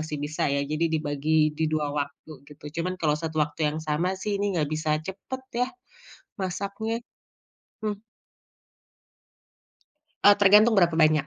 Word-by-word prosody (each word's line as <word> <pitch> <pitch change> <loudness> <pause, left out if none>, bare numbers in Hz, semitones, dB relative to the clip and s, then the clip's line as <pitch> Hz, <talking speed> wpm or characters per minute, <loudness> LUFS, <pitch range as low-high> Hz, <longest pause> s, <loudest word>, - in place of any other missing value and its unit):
masih 155 -1 -4
bisa 150 0 -1
ya 140 0 +1
jadi 155 +3 0
dibagi 155 0 +1
di 160 +1 -1
2 150 -2 0
waktu 155 +2 -7 0.2
gitu, 150 0 -16 0.2
cuman 180 +2 -2
kalau 155 -2 +2
satu 160 -1 -4
waktu 150 +2 -12
yang 155 +1 -3
sama 175 +5 0
sih 200 +1 -2
ini 200 -3 0
enggak 150 -3 +1
bisa 155 0 0
cepet 200 +8 -6 0.2
ya 250 - +3 0.7
masaknya. 200 +5 -3 0.8
Mmm. 205 -1 -2 2.2
Eee, 205 0 +8
tergantung 210 +3 +7
berapa 170 -2 +4
banyak, 155 -2 +4
160 Hz, 145 wpm, -26 LUFS, 150-200 Hz, 2.2 s, Eee